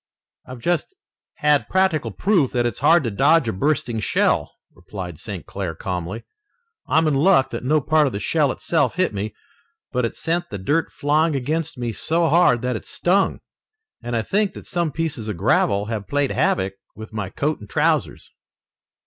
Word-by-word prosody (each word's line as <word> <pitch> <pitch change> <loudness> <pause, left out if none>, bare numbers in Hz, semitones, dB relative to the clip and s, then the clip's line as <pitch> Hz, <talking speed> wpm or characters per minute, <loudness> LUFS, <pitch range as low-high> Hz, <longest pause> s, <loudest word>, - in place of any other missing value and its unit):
"I've 130 0 -8
just 175 - -1 0.4
had 150 -1 +2
practical 185 -10 +1
proof 170 - +1
that 120 -1 +1
it's 120 -4 -2
hard 165 +3 +5
to 115 - -2
dodge 140 +6 +3
a 110 - -1
bursting 120 0 0
shell," 105 - +1 0.2
replied 90 -2 -8
St. - - -7
Clair 95 -5 -5
calmly. 90 +5 -4 0.6
"I'm 160 0 +3
in 150 - +2
luck 145 0 +4
that - - -5
no 150 +4 +2
part 155 +1 +3
of - - -2
the 100 - -3
shell 145 +5 +1
itself 160 +1 0
hit 185 -9 +1
me, 105 +1 -4 0.6
but 125 - 0
it 115 - -2
sent 170 +2 -2
the 100 - -5
dirt 145 - 0
flying 150 +2 +1
against 150 +3 -2
me 120 -2 -3
so 165 +8 +1
hard 155 -8 +4
that 125 -1 -1
it - - -7
stung, 190 +3 +1 0.6
and 120 0 -4
I 115 - 0
think 200 - 0
that - - -10
some 170 -3 -1
pieces 145 -8 -3
of 105 -5 -4
gravel 100 +1 +2
have 110 -2 -4
played 145 -1 0
havoc 140 - +1 0.2
with 110 +1 -10
my 100 -4 -3
coat 150 +9 -2
and 105 - -12
trousers." - - 0
135 Hz, 185 wpm, -22 LUFS, 110-165 Hz, 0.6 s, hard